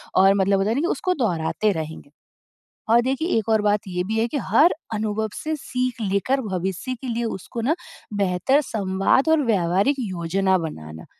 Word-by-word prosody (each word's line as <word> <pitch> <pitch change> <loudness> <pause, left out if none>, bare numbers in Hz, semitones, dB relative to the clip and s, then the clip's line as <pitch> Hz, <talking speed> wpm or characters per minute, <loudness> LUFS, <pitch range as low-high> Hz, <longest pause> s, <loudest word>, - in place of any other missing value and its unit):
और 195 +1 +6
मतलब 195 0 +2
होता 195 +2 +1
है 225 - +1
ना 280 - +1
कि 340 - +1
उसको 365 0 0
दोहराते 185 +2 0
रहेंगे। 160 -4 -6 0.8
और 235 +1 +6
देखिए 265 +6 -1
एक 220 - -1
और 220 -1 +3
बात 210 0 +2
ये 180 -1 -2
भी 220 +1 -1
है 230 - +2
कि 290 - -3
हर 315 +4 +4 0.2
अनुभव 215 0 -1
से 315 0 -3
सीख 250 -3 -3
लेकर 255 +8 +1
भविष्य 190 +2 -3
के 265 - -6
लिए 235 0 -2
उसको 225 +2 -5
ना 280 +8 +1 0.4
बेहतर 200 - +2
संवाद 200 +4 +1
और 320 -1 +4
व्यावहारिक 195 +4 +2
योजना 190 -2 0
बनाना। 80 - -7
210 Hz, 180 wpm, -23 LUFS, 185-250 Hz, 0.8 s, और